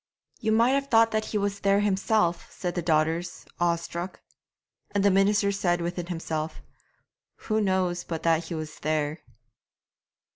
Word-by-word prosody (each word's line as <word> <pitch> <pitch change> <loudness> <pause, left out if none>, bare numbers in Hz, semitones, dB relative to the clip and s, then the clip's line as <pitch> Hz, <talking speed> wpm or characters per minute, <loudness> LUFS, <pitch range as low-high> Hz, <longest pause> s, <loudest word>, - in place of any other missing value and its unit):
'You 220 - 0
might 230 +3 +4
have 275 0 +1
thought 225 -3 +4
that 215 0 0
he 215 - -2
was 200 0 -1
there 200 0 +3
himself,' 195 -3 +1
said 180 -2 -4
the 175 - -2
daughters, 160 +1 0
awestruck. 170 +1 -2 0.7
And 200 -1 0
the 200 - +6
minister 200 +1 +3
said 175 -3 +1
within 175 0 -3
himself, 160 -2 -4 0.8
'Who 215 0 0
knows 185 -3 0
but 165 -2 -5
that 165 0 +2
he 165 - -5
was 155 -1 -6
there?' 155 0 -1
180 Hz, 150 wpm, -27 LUFS, 170-205 Hz, 0.8 s, the